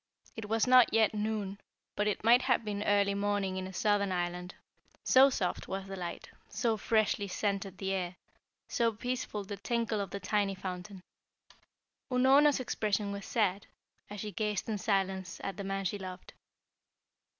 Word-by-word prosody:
It 220 -2 -7
was 225 0 +2
not 255 -1 +6
yet 220 -1 +4
noon, 210 -2 -3 0.3
but 210 - 0
it 210 - -1
might 240 +3 +6
have 245 -3 +1
been 205 -1 -3
early 200 -1 +2
morning 200 -1 -1
in 185 0 -3
a - - -8
southern 200 0 +1
island, 180 0 -3 0.5
so 265 +2 +7
soft 185 -9 -2
was 195 0 -4
the 195 0 -6
light, 175 -2 -6 0.2
so 225 0 0
freshly 215 -1 +1
scented 195 -1 -2
the 190 0 -2
air, 180 -2 -2 0.5
so 230 -3 +1
peaceful 240 -2 -3
the 200 +1 -6
tinkle 225 +1 -1
of 200 - -4
the 200 - -5
tiny 200 0 0
fountain. 185 0 -7 1.1
Unorna's 270 +3 +5
expression 210 -4 -1
was 200 0 -6
sad, 200 -3 0 0.4
as 205 -1 -6
she 210 - -5
gazed 210 +1 -2
in 215 -2 -2
silence 190 -2 -1
at 195 - -4
the 200 - -4
man 195 0 -3
she 200 +3 -1
loved. 185 -1 -8
205 Hz, 165 wpm, -31 LUFS, 195-220 Hz, 1.1 s, so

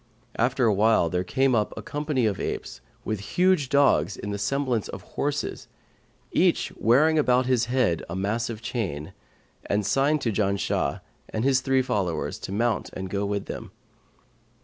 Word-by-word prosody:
After 125 +2 +1
awhile, 105 -4 +3
there 90 0 0
came 135 +7 +1
up 105 -3 0
a - - -6
company 145 -4 -1
of 105 -3 0
apes - - -4 0.2
with 110 -2 -2 0.2
huge 180 -7 +3
dogs 140 -7 +3
in 105 - -5
the 100 - -3
semblance 130 -3 0
of - - -8
horses, 145 0 -2 0.6
each - - +2
wearing 155 +8 +4
about 125 -3 +3
his 125 -2 +2
head 120 -9 +1
a 85 - -4
massive 110 +3 -2
chain; 90 - -3 0.5
and 105 0 0
signed 140 +7 +2
to 115 - 0
Janshah 100 -2 0 0.3
and 110 - -2
his 130 -1 +3
three 130 0 +2
followers 95 -9 -2
to - - -7
mount 115 +2 0
and 95 0 -6
go 100 0 -1
with 100 -1 -2
them. - - -7
115 Hz, 160 wpm, -25 LUFS, 100-135 Hz, 0.6 s, wearing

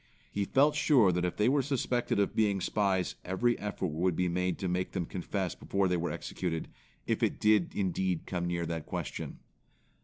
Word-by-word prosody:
He 100 0 -1
felt 145 +7 +4
sure 125 - +5
that 90 0 0
if 90 - -2
they 105 - +3
were 140 +2 +4
suspected 125 -5 0
of 100 - +1
being 105 -3 +2
spies 95 -2 +1
every 115 +7 +1
effort 100 -3 -2
would 85 +3 +1
be 90 +1 +1
made 90 +1 0
to 95 - -3
make 90 +1 -1
them 90 -3 -1
confess 95 +1 -3
before 100 -1 0
they 90 -1 +1
were 85 +1 -1
executed, 80 -3 -3 0.4
if - - 0
it - - +1
did 105 -4 +3
indeed 95 -2 0
come 85 -1 -2
near 85 -1 -1
that 80 -1 -4
question. - - -4
95 Hz, 190 wpm, -31 LUFS, 90-105 Hz, 0.4 s, sure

